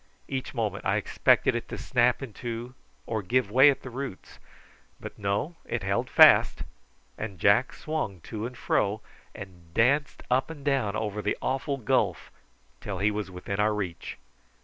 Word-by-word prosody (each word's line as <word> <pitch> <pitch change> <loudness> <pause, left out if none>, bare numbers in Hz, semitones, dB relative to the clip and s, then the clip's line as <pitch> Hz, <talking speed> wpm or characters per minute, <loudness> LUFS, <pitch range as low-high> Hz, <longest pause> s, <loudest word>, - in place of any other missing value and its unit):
Each 130 -1 -4
moment 105 -4 -2
I - - +1
expected - - +2
it - - -4
to - - -5
snap 125 +3 +1
in 120 -5 -8
two 120 +2 -6 0.3
or 110 -2 -2
give 105 +2 0
way 130 +5 +7
at 140 - -1
the 130 - -8
roots; 130 -5 -7 0.6
but - - -9
no: 105 +12 -2
it 120 -4 -4
held 100 +1 -1
fast, - - +6 0.6
and 105 -3 -5
Jack 100 +8 +3
swung 155 - -4
to 110 +4 -5
and 125 -1 -11
fro, 105 +2 0 0.3
and 90 -5 -11
danced 140 +5 +2
up 130 +3 +2
and 145 -3 -9
down 130 -8 +1
over 105 -1 -3
the - - -1
awful 135 +1 -2
gulf 115 -5 0 0.5
till 100 -2 -5
he 105 +3 +2
was 105 -2 -4
within 95 +2 -5
our 105 0 +2
reach. 90 -5 -5
110 Hz, 170 wpm, -27 LUFS, 100-130 Hz, 0.6 s, way